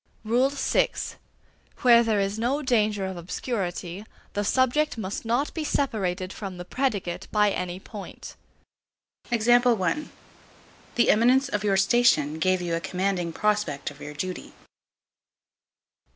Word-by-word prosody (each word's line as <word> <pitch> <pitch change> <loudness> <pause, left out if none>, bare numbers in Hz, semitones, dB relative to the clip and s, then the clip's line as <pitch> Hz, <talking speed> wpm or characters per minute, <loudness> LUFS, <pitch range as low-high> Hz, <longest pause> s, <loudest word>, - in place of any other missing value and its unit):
VI. 260 +5 +2 0.9
Where 235 -2 +7
there 220 -3 +1
is 200 +2 -1
no 270 +6 0
danger 215 -6 +1
of 190 -1 -5
obscurity, 180 0 -4 0.3
the 205 - -1
subject 260 +6 +1
must 205 +1 -4
not 245 +6 0
be 320 - -3
separated 190 -11 -1
from 195 -3 -7
the 175 - -7
predicate 200 -7 -2
by 210 -1 +3
any 180 -1 -3
point. 205 0 -10 0.9
The 240 +2 +2 1.0
eminence 255 +5 +4
of 205 -4 -2
your 200 -2 +2
station 190 - +3
gave 185 +1 +2
you 170 -1 -2
a 165 - +1
commanding 185 -1 -1
prospect 205 -8 -1
of 145 - -16
your 150 0 -8
duty. 185 +4 -5
205 Hz, 125 wpm, -26 LUFS, 180-240 Hz, 1.0 s, Where